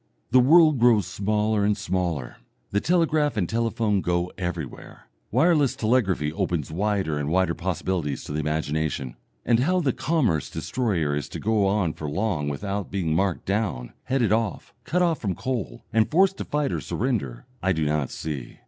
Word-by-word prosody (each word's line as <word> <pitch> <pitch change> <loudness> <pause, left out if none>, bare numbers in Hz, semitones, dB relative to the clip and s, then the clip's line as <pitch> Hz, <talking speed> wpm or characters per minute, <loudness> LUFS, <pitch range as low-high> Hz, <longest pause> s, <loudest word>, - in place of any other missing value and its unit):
The 130 - +6
world 155 +2 +6
grows 115 -4 +5
smaller 105 +1 0
and 105 0 +2
smaller, 85 -9 -2 0.3
the 100 - +1
telegraph 155 -5 +2
and 90 -4 +1
telephone 110 -2 0
go 90 0 0
everywhere, 85 -7 -6 0.2
wireless 155 -6 +3
telegraphy 100 -10 +1
opens 80 -3 -2
wider 95 -4 0
and 75 0 -2
wider 95 0 +2
possibilities 85 -4 -2
to - - -8
the 75 - -2
imagination, 75 -3 -2 0.3
and 115 - +3
how 180 +8 +2
the 140 -8 +1
commerce 125 - 0
destroyer 85 - -1
is 75 - -4
to - - -6
go 105 -2 +2
on 95 -5 +1
for 75 - -5
long 85 -4 -1
without 100 +7 -3
being 90 -5 -1
marked 95 +1 0
down, 95 - -2
headed 125 -5 +1
off, 110 -3 -1
cut 180 +2 +1
off 170 -3 +1
from 95 -5 -1
coal, 115 - -4
and 110 -1 +3
forced 190 +4 +3
to - - -4
fight 150 -1 -1
or - - -2
surrender, 105 - -2 0.2
I 95 - +1
do 80 -3 0
not 75 -3 0
see. 75 -6 -6
100 Hz, 170 wpm, -25 LUFS, 80-120 Hz, 0.3 s, The